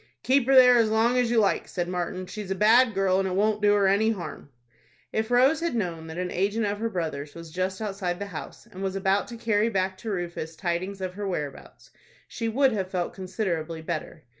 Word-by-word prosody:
"Keep 265 -1 +3
her 270 - +4
there 250 -1 +8
as 225 -2 +3
long 225 +3 +2
as 250 -2 +2
you 235 - +1
like," 205 -3 +2
said 175 -2 -3
Martin. 180 +1 -3
"She's 210 +1 -7
a 190 - -1
bad 225 +3 +5
girl, 190 -1 +2
and 195 - 0
it 185 - -2
won't 210 +2 +1
do 205 0 +4
her 200 -1 +3
any 205 +3 +3
harm." 185 -8 -5 0.6
If 220 +1 -1
Rose 260 +6 +4
had 335 -6 -2
known 170 -7 -3
that 160 +1 -8
an 180 0 -2
agent 205 +4 0
of 205 0 -2
her 230 +1 -1
brother's 155 -7 -4
was 165 -1 -10
just 185 +2 -2
outside 195 -4 -3
the 200 - -4
house, 190 -6 -8
and 185 - -11
was 195 0 -2
about 195 +1 +1
to 235 - -8
carry 225 -1 +1
back 190 -2 -1
to 225 - -6
Rufus 170 -4 -4
tidings 185 +3 -3
of 185 -1 -3
her 205 +1 -4
whereabouts, 150 -7 -6 0.4
she 230 -2 -3
would 265 +3 +3
have 195 -4 -2
felt 180 -2 -2
considerably 170 -4 -3
better. 160 -1 -5
195 Hz, 225 wpm, -26 LUFS, 180-220 Hz, 0.6 s, there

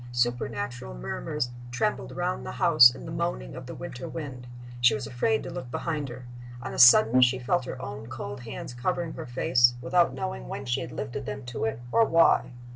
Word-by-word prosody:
Supernatural 120 - -2
murmurs 65 - -4 0.2
trembled 120 - -2
round 60 +1 -2
the 60 0 -6
house 120 - +7
in 120 - -10
the - - -7
moaning - - -3
of - - -9
the - - -7
winter 125 +1 -7
wind. 130 -6 -7 0.3
She 120 +2 +5
was 135 -3 -4
afraid 115 -1 0
to - - -6
look 125 - -7
behind 150 +1 -3
her. 125 +1 -9 0.3
On - - -6
a - - -5
sudden 125 0 +8
she 125 0 +4
felt 130 +8 0
her - - -6
own 105 -1 -7
cold 105 -3 -6
hands 120 +1 -7
covering 165 +6 -2
her - - -7
face, 120 0 +3
without 135 +8 +2
knowing 60 -1 -5
when 135 - -6
she 120 -1 -1
had - - -6
lifted 120 +3 -5
them 105 +5 -6
to 120 -2 -3
it, 110 +1 -2
or 230 - +5
why. 165 -6 +4
120 Hz, 200 wpm, -27 LUFS, 110-130 Hz, 0.3 s, sudden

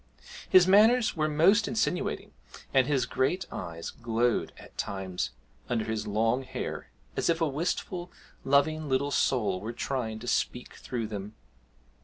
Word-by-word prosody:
His 185 -1 +7
manners 220 +5 +5
were 155 -2 +1
most 180 +9 +4
insinuating, 220 -5 -1 0.4
and 130 -1 +4
his 135 -4 +2
great 135 +9 0
eyes 85 -2 -6
glowed 115 0 0
at - - -14
times 95 -9 -3 0.4
under 115 -3 0
his 110 -1 -3
long 115 +4 +1
hair, 130 -1 -5 0.3
as - - 0
if 165 0 +2
a 165 - +2
wistful, 175 +4 -3 0.3
loving 150 +2 +2
little 135 +2 +1
soul 110 -10 +1
were 110 +3 -5
trying 120 -3 -3
to 120 +2 -9
speak 125 0 -1
through 120 -3 -4
them. 105 0 -6
130 Hz, 145 wpm, -29 LUFS, 110-160 Hz, 0.4 s, His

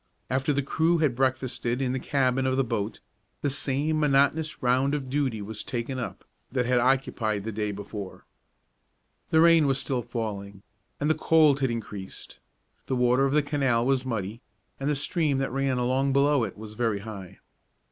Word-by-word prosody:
After 135 +3 +1
the 140 -1 0
crew 160 +5 +2
had 150 -7 +1
breakfasted 130 -1 -1
in 130 -2 0
the 130 - -1
cabin 130 -1 +1
of 130 0 +1
the 135 - +3
boat, 115 -3 -3 0.4
the 145 - +1
same 145 +3 0
monotonous 150 +1 +2
round 130 +3 +2
of 135 -3 -5
duty 130 -7 -1
was 105 +1 -5
taken 130 +1 -4
up 125 - -6 0.3
that 125 -1 0
had 125 0 +3
occupied 120 -5 +1
the 110 - -4
day 105 0 -2
before. 100 -1 -8 1.1
Rain 165 -1 +6
was 135 0 +1
still 130 -2 -1
falling, 100 -4 -5 0.4
and 145 - 0
the 155 - +4
cold 155 -2 +4
had 130 -1 +1
increased. 105 -4 -7 0.5
The 130 - 0
water 125 +2 +3
of 135 - -1
the 150 0 +3
canal 135 -5 +1
was 135 -1 +2
muddy, 115 -2 -4 0.4
and 135 +1 -1
the 150 - +1
stream 150 0 0
that 135 -1 -1
ran 135 -1 0
along 130 +2 +1
below 140 -2 +3
it 100 - -8
was 110 0 -9
very 110 -3 -1
high. 100 -4 -9
130 Hz, 175 wpm, -27 LUFS, 115-140 Hz, 1.1 s, Rain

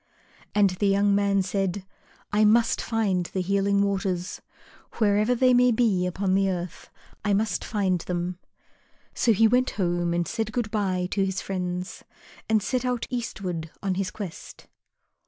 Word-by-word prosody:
And 205 -2 +4
the 190 +3 0
young 200 +1 +3
man 200 -1 +2
said, 195 0 -2 0.5
"I 210 +1 +4
must 225 +2 +4
find 200 -6 0
the 190 - -3
Healing 200 +2 +2
Waters. 190 -2 -2 0.5
Wherever 215 +2 +2
they 255 +1 +4
may 250 0 +5
be 220 -6 +2
upon 185 +1 -1
the 195 0 +3
earth, 180 -1 -5 0.3
I 205 0 +1
must 215 +2 0
find 195 -4 0
them." 175 0 -3 0.7
So 235 - +2
he 220 +1 +5
went 250 +3 +2
home 175 -2 0
and 175 0 0
said 220 -1 -2
good 235 -4 -2
bye 185 -4 0
to 195 - +1
his 190 -1 -1
friends, 180 -1 -4 0.5
and 215 -2 +3
set 255 +3 -1
out 250 -2 -1
eastward 185 -9 -4
on 195 -1 0
his 185 0 -2
quest. 190 -4 -9
200 Hz, 155 wpm, -25 LUFS, 185-215 Hz, 0.7 s, may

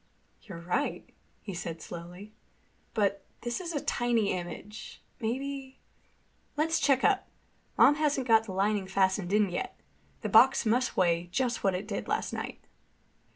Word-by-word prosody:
"You're 190 -6 -9
right," 180 +12 -2 0.4
he 195 - -6
said 170 -2 -5
slowly. 180 +5 -9 0.6
"But 200 -2 +1 0.2
this 240 +7 -3
is 345 -2 -4
a - - +1
tiny 240 -6 +1
image. 185 +4 -7 0.2
Maybe—" 265 +3 -4 0.8
"Let's 320 +2 +2
check 275 -2 +3
up. - - +3 0.5
Mom - - +7
hasn't 290 -4 +1
got 225 -1 +5
the 205 - -6
lining 195 +1 0
fastened 190 -1 +1
in 205 -2 +3
yet. 175 - -4 0.4
The - - -2
box 265 -2 +6
must 245 +4 +1
weigh 170 -1 +2
just 240 +5 -1
what 195 -2 +2
it 195 +3 -4
did 200 -2 -4
last - - -1
night." - - -5
210 Hz, 150 wpm, -29 LUFS, 190-255 Hz, 0.8 s, Mom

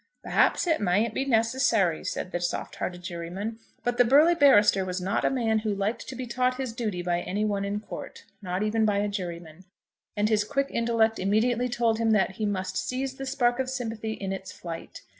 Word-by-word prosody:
"Perhaps - - +2
it 325 -6 +1
mayn't 205 +4 +2
be 270 - -1
necessary," 225 - +2
said 185 - -4
the 175 - -2
soft 175 - -3
hearted 180 -1 -4
juryman. 180 +6 -5 0.2
But 245 0 -1
the - - +8
burly 290 +8 +6
barrister 215 - +5
was 185 0 -3
not 185 +2 -1
a - - +3
man 225 -4 +1
who 215 -2 -2
liked 200 +4 -2
to 265 - -6
be 255 0 -5
taught 250 +1 0
his 260 -3 -3
duty 215 -7 -3
by 175 0 0
any 205 +4 -1
one 200 -2 -1
in 200 +1 -2
court, - - -8 0.2
not 185 0 -2
even 220 +1 +1
by 210 -2 +2
a 205 +1 +1
juryman, 175 -4 -6 0.5
and 205 +1 +2
his 215 -1 +2
quick 275 +5 -1
intellect 230 -1 +1
immediately 230 +5 +1
told 230 -2 +1
him 225 -1 +3
that 190 -2 +1
he 215 - -1
must 190 -1 -2
seize 265 +1 -3
the 270 - -5
spark 245 -2 +1
of 260 -1 -1
sympathy 225 -4 -3
in 195 -2 -4
its 190 -1 -6
flight. 165 -2 -8
215 Hz, 210 wpm, -27 LUFS, 190-245 Hz, 0.5 s, the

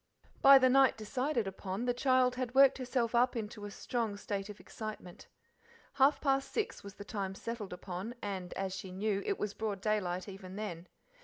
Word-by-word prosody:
By 275 0 +10
the 260 -1 +5
night 265 -1 +5
decided 250 +2 -1
upon, 195 +3 -4
the 245 - +2
child 255 0 +3
had 255 0 -4
worked 275 0 +6
herself 250 -2 -1
up 245 +2 +3
into 210 -2 -5
a - - -5
strong 220 0 -3
state 200 0 -4
of 210 - -9
excitement. 215 -5 -8 0.7
Half 275 +2 +4
past 275 -1 +1
six 440 - -2
was 200 0 -10
the 205 - -9
time 195 -2 -4
settled 230 -2 -5
upon, 185 +5 -6
and, 190 -4 -5
as 190 -1 -2
she 190 -1 -6
knew, 200 +1 -1
it - - 0
was 210 -1 -3
broad 210 -3 -3
daylight 185 -3 -1
even 190 -1 -9
then. 180 -5 -5
215 Hz, 185 wpm, -33 LUFS, 195-250 Hz, 0.7 s, By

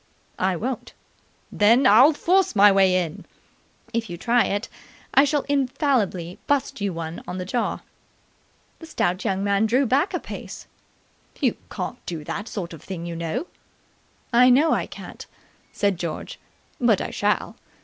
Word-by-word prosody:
"I 185 0 +1
won't." 245 +7 -4 0.6
"Then 230 +6 +4
I'll 260 +7 +7
force 370 - +2
my 205 0 +7
way 190 -1 +4
in!" 180 +1 -2 0.7
"If 230 -1 -2
you 175 - -6
try 235 +5 +2
it, 205 +2 -2 0.5
I 275 - +6
shall 290 0 0
infallibly 255 - 0
bust 285 -6 0
you 200 -1 0
one 165 -1 -6
on 180 - -5
the 185 - -4
jaw." 235 +6 -2 1.0
The 325 - -11
stout 180 - -1
young 195 0 -1
man 200 +2 +2
drew 255 +5 +2
back 275 - +1
a - - -1
pace. - - -9 0.7
"You - - +1
can't - - -6
do 165 -3 -5
that 205 +8 -5
sort 180 -7 -5
of 160 - -11
thing, 170 -1 -7
you 170 -1 -5
know." 170 - -3 0.9
"I 250 +2 +6
know 290 +6 +4
I - - -1
can't," - - -10 0.5
said 200 -4 0
George, 170 -3 -5 0.4
"but - - +3
I - - -4
shall. - - -1
205 Hz, 160 wpm, -23 LUFS, 180-260 Hz, 1.0 s, I'll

